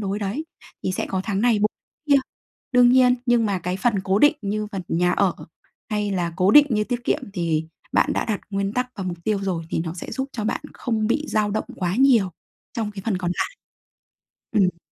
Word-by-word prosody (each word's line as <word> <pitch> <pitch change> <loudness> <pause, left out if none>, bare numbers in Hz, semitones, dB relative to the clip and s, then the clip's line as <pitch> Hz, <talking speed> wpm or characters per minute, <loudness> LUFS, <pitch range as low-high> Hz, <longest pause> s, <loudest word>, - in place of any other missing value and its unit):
đối 200 0 -2
đấy. 210 +9 -3 0.4
Thì 185 - 0
sẽ - - -2
có 190 - -2
tháng 200 -3 -1
này 235 -1 +3
bù 210 - +4 0.4
kia. 285 - +7 0.6
Đương 245 -1 +6
nhiên, 250 -1 +6
nhưng 240 -2 +3
mà 200 -2 0
cái 180 +1 -3
phần 230 +4 +1
cố 190 +1 +2
định 295 +5 +6
như 210 +1 -2
phần 195 -2 -3
nhà 175 +2 +2
ở, 195 -4 +2 0.6
hay 210 -1 0
là 175 -3 -1
cố 185 +1 +4
định 295 +6 +8
như 210 -2 +1
tiết 245 +1 -3
kiệm 285 - 0
thì 165 -4 -1 0.3
bạn - - +3
đã - - 0
đặt 215 -3 -2
nguyên 195 0 -1
tắc 250 +2 -1
và 195 - -4
mục 175 -2 -4
tiêu 215 -2 +1
rồi 180 -4 -2
thì - - -1
nó 165 0 -4
sẽ 175 - -7
giúp 265 0 -3
cho 220 - -4
bạn 215 - -1
không 220 -3 -1
bị 295 +7 +1
dao 210 -1 +1
động 215 - -1
quá 180 0 -1
nhiều 245 -7 +4 0.4
trong 220 -3 -2
cái 200 -2 -8
phần 210 -5 0
còn 180 -1 -2
lại. - - -2 1.0
Ừm. 185 -5 +2
205 Hz, 225 wpm, -23 LUFS, 185-235 Hz, 1.0 s, định